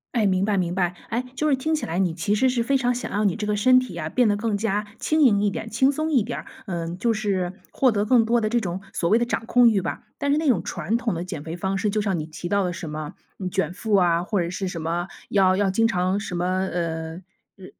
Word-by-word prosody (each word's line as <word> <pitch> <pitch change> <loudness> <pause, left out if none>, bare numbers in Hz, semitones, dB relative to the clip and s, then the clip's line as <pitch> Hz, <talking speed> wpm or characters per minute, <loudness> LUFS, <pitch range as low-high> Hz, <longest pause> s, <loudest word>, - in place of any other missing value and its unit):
哎， 225 -3 +3
明 190 -1 +2
白 210 -1 +1
明 175 -2 0
白。 180 -1 0
哎， 240 +2 -1
就 305 +2 +1
是 270 - +3
听 315 +4 0
起 305 - -3
来 165 +3 -2
你 180 -4 +1
其 200 +5 0
实 260 +4 +3
是 240 -2 0
非 275 +3 +2
常 245 -1 +1
想 245 - -5
让 210 0 +2
你 185 - 0
这 215 - -3
个 210 0 0
身 255 +4 +5
体 255 - -7
啊， - - -3
变 245 -4 +2
得 205 - +1
更 215 0 -1
加 210 0 -1
轻 310 +6 +1
盈 210 -7 +5
一 205 - +3
点、 225 +3 -5
轻 265 +5 +3
松 310 +3 -2
一 265 -8 +3
点 - - -4
儿， - - -10 0.2
嗯， 170 -1 -4
就 235 +5 +1
是 195 -5 -1 0.2
获 260 -2 +3
得 205 -1 0
更 235 +1 +5
多 235 +2 +2
的 215 - 0
这 240 +2 +1
种 180 -2 -3
所 170 - 0
谓 225 - +5
的 240 - +1
掌 235 - -2
控 245 0 +5
欲 205 -4 +1
吧。 - - -4
但 285 0 0
是 290 - +3
那 315 0 0
种 245 -8 +3
传 180 +5 -2
统 235 -4 0
的 170 +1 -4
减 170 -6 -6
肥 165 +2 -6
方 190 +2 -1
式， 210 +2 0
就 210 +1 0
像 195 -4 0
你 155 - -3
提 160 +2 -7
到 200 +2 +1
的 180 - -1
什 170 -2 -6
么， 150 +2 -5 0.3
嗯， 185 -2 -4
卷 190 -2 -1
腹 210 +2 0
啊， 175 -3 +3
或 200 +2 -1
者 170 - -2
是 185 +1 -3
什 170 -3 -5
么 170 +2 -2 0.2
要 190 -2 +3
要 200 -1 +2
经 225 +4 +2
常 185 -3 +1
什 205 -3 -4
么， 175 +1 -1
呃 170 -3 -2 0.4
呃， 190 - -12
200 Hz, 305 characters per minute, -24 LUFS, 180-230 Hz, 0.4 s, 身